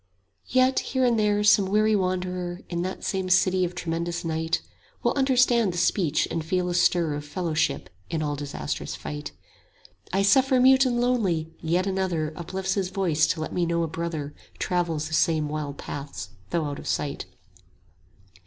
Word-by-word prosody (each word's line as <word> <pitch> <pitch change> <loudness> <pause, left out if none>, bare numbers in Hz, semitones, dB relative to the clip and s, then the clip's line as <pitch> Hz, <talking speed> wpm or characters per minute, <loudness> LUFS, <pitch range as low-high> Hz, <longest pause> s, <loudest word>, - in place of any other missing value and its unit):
Yes, 255 +1 +3
here 260 -1 0
and 235 -2 +3
there 210 -1 +2
some 205 -2 +5
weary 215 +2 +3
wanderer 180 -2 -2
In 170 -1 -2
that 185 +1 -4
same 190 -1 -2
city 185 0 +3
of 180 0 -2
tremendous 170 0 -3
night, 160 +1 -1
30 - - -28 0.3
Will - - +2
understand 250 -6 +3
the - - -5
speech 170 -3 +2
and 165 - -2
feel 180 +2 0
a - - -1
stir 175 -2 +2
Of 145 0 -4
fellowship 155 - -1 0.2
in 160 -1 -1
all 145 -1 -1
disastrous 145 0 -4
fight; 75 0 -6 0.8
"I 195 +1 +2
suffer 260 +6 +4
mute 265 +1 +6
and 240 -1 0
lonely, 190 -11 0
yet 175 +3 +1
another 185 -5 -1
Uplifts 190 +3 -3
his 190 -3 -1
voice 165 -5 +1
to 155 - -1
let 155 - -4
me 180 - 0
know 170 0 +1
a - - -1
brother 160 -3 -4 0.2
Travels 170 -4 -1
the 160 - -8
same 155 -1 +2
wild 145 -2 -4
paths 140 0 -6 0.2
though 170 -2 0
out 145 -1 -4
of - - -9
sight." 140 -9 -2
175 Hz, 175 wpm, -25 LUFS, 160-195 Hz, 0.8 s, mute